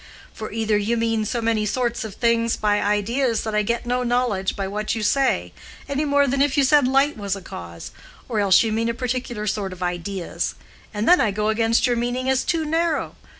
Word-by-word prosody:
"For 215 - -7
either 220 -1 0
you 225 +3 0
mean 225 -1 0
so 235 +2 -2
many 225 -1 +1
sorts 235 +2 -1
of 215 -3 -7
things 230 -1 +1
by 205 -1 +1
ideas 225 +4 0
that 220 - -4
I 210 - +2
get 235 +3 -2
no 250 +1 0
knowledge 240 -6 0
by 195 -1 -3
what 210 +3 -2
you 220 - -3
say, 205 - +1 0.3
any 280 +2 -1
more 285 0 +3
than 275 +1 0
if 285 -1 +2
you 280 - +5
said 275 0 +4
light 275 +2 +2
was 200 -2 -2
a - - -7
cause; 85 - -9 0.4
or 225 -3 -1
else 195 -1 +5
you 225 - -1
mean 225 +1 0
a 230 - -2
particular 245 -3 -3
sort 205 -2 -2
of 185 0 -7
ideas, 175 +1 -3 0.4
and 210 +1 -3
then 360 - +6
I 215 - +2
go 210 +2 -1
against 225 +2 +2
your 245 -2 +1
meaning 245 +2 -2
as 265 0 +1
too 325 -2 0
narrow. 325 +1 -1
230 Hz, 220 wpm, -22 LUFS, 210-250 Hz, 0.4 s, then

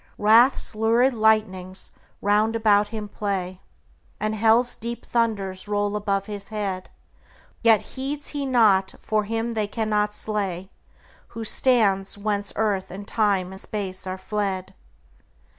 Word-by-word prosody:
Wrath's 230 +5 +4
lurid 230 +4 +3
lightnings 210 -4 +1 0.3
round 210 +2 +2
about 210 -2 +4
him 215 -1 -6
play, 190 -3 -3 0.6
And 215 0 -1
hell's 225 +3 +3
deep 235 +1 -6
thunders 205 -5 -1
roll 205 0 0
about 200 -2 -1
his 205 -1 -6
head; 200 -4 -3 0.7
Yet 225 -2 +5
heeds 280 +2 -4
he 290 -2 -3
not, 210 -7 +3
for 215 -1 0
him 225 +2 -2
they 215 -2 -1
cannot 210 -1 -1
slay 195 -4 -3 0.7
Who 225 - -3
stands 205 -5 +2
whence 205 -1 -2
earth 205 -3 0
and 200 +3 -8
time 200 -4 +1
and 190 +1 -9
space 190 -3 -5
are 185 0 -3
fled. 190 -1 -3
210 Hz, 130 wpm, -24 LUFS, 195-225 Hz, 0.7 s, Yet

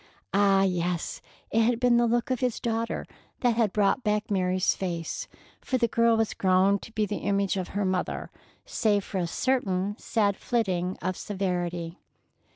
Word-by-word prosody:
Ah, 195 -1 +4
yes! 180 -2 -1 0.3
it 225 - +3
had 230 +1 +2
been 245 -1 +4
the 240 0 +3
look 240 +2 0
of 255 - 0
his 250 -3 -1
daughter 230 0 -2 0.4
that 245 -3 +4
had 225 -4 +2
brought 210 +5 +2
back 210 +1 0
Mary's 185 -1 +2
face, 170 -3 -4 0.3
for 260 - -1
the 235 -2 +2
girl 230 -1 +3
was 225 -1 0
grown 190 +1 +3
to 225 - -12
be 215 -1 +1
the 205 - -3
image 200 -1 0
of 185 -2 -2
her 205 - +1
mother, 185 -1 -2 0.3
save 205 -2 +1
for 190 - -4
a 175 - -1
certain 205 -3 0
sad 205 -3 +1
flitting 185 -6 -1
of 185 +1 -1
severity. 175 -4 -3
200 Hz, 170 wpm, -27 LUFS, 185-230 Hz, 0.4 s, Ah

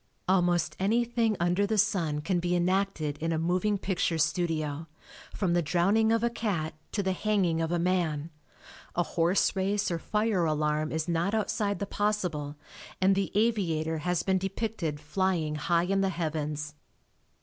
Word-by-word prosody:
Almost 175 -3 +2
anything 230 +1 +1
under 175 +4 +2
the 220 +1 0
sun 160 -7 +1
can 175 +3 0
be 175 +1 0
enacted 175 -5 0
in 165 +1 -1
a 160 - 0
moving 180 +5 +1
picture 185 -3 -1
studio, 160 -2 -1 0.4
from 185 -4 0
the 175 - +3
drowning 195 +8 +2
of 230 0 +2
a 235 - +3
cat 190 -9 -2 0.2
to 200 - 0
the 190 - +1
hanging 185 -4 +1
of 165 0 -1
a 175 - +1
man; 170 -3 0 0.6
a 175 - +2
horse 175 +4 +1
race 195 +1 0
or 170 - -1
fire 210 -1 0
alarm 155 0 0
is 160 +1 -2
not 175 +5 0
outside 210 -1 0
the 200 - -3
possible 180 -9 -1 0.4
and 190 +1 +4
the 195 -1 -1
aviator 170 -8 +1
has 180 +2 0
been 190 -1 +2
depicted 195 -5 -3
"flying" 165 0 0
high 170 +3 +1
in 195 +2 +1
the 195 - +2
heavens. 155 -3 -3
180 Hz, 160 wpm, -29 LUFS, 160-200 Hz, 0.6 s, and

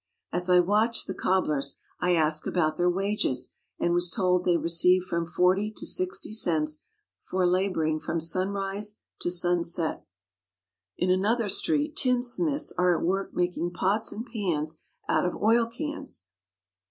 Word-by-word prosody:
As 180 +1 +1
I 180 0 +6
watched 210 +6 +2
the 190 - -4
cobblers 150 -8 0 0.2
I 180 0 +2
asked 155 -1 +1
about 155 -3 +1
their 175 +2 +2
wages 195 -6 0 0.3
and 170 - +1
was 175 0 +1
told 180 +1 +1
they 175 -1 +3
received 175 +2 +3
from 170 -2 -2
forty 180 +4 +2
to - - -3
sixty 370 - 0
cents 155 -7 +1 0.4
for 185 0 -1
labouring 175 -4 +1
from 170 - -2
sunrise 195 +4 -2 0.2
to - - 0
sunset. 175 -2 0 0.9
In 180 +1 +1
another 205 +4 +1
street 300 - +1
tinsmiths 255 +4 +1
are 180 -1 +3
at - - -2
work 195 +2 -1
making 175 0 -1
pots 200 +5 +1
and 225 +3 -6
pans 170 - -2 0.3
out - - +2
of 180 - -1
oil 230 +2 +3
cans. 285 - -5
180 Hz, 145 wpm, -27 LUFS, 170-210 Hz, 0.9 s, I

